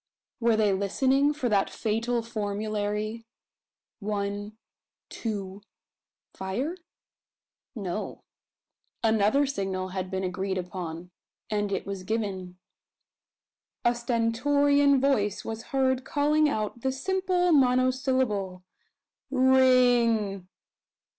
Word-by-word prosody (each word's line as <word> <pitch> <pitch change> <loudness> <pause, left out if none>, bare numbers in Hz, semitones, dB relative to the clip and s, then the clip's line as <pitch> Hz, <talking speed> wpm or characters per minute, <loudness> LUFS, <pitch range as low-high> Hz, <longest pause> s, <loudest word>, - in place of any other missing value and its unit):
Were 230 -2 +3
they 210 -2 +3
listening 265 +9 +2
for 290 -4 -2
that 200 -2 +2
fatal 230 +2 -1
formulary: 215 0 -3 0.7
One 205 0 -3 0.5
two 200 -3 -5 0.7
fire? 240 - -3 1.0
No. 200 -1 -5 0.8
Another 220 +5 +3
signal 190 -8 -3
had 185 0 -4
been 190 0 -3
agreed 190 +1 -2
upon; 180 -1 -6 0.4
and 205 -1 0
it - - -2
was 200 -1 -5
given. 190 -3 -3 1.3
A 240 - +5
stentorian 275 +5 +2
voice 230 -7 +1
was 225 +1 -5
heard 265 -3 +1
calling 295 +2 +2
out 215 -2 -3
the 265 - 0
simple 360 +5 0
monosyllable 255 - +2 0.7
"Ring!" 245 -7 +3
225 Hz, 90 wpm, -27 LUFS, 200-260 Hz, 1.3 s, A